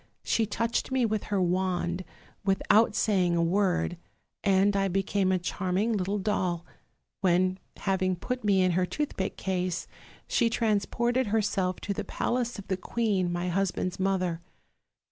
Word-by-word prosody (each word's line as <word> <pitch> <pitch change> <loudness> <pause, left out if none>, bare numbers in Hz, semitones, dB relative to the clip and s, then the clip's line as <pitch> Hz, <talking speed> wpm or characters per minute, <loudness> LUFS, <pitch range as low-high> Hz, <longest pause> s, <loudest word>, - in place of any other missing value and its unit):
She 225 -2 +1
touched 230 +4 -1
me 260 -2 +2
with 215 -2 -1
her 200 -2 0
wand, 180 0 0 0.4
without 200 +3 +3
saying 185 -5 +2
a 170 - +2
word, 180 0 +1 0.5
and 200 0 +3
I 195 0 +2
became 195 0 +1
a 185 - +3
charming 185 +4 -1
little 200 0 0
doll; 185 -4 -1 0.5
when, 185 0 +2 0.2
having 190 -1 0
put 250 +8 -4
me 195 -3 +4
in 185 - +3
her 180 +1 +1
toothpick 210 -9 -3
case, 185 -2 -2 0.4
she 235 -2 +2
transported 235 +3 +1
herself 200 -4 0
to 200 - -2
the 205 - -3
palace 240 +4 -1
of 200 - -9
the 190 - -1
queen, 195 -3 0
my 175 +1 -1
hus 195 +2 +1
band's 185 +2 -3
mother. 185 -3 0
195 Hz, 150 wpm, -28 LUFS, 185-210 Hz, 0.5 s, me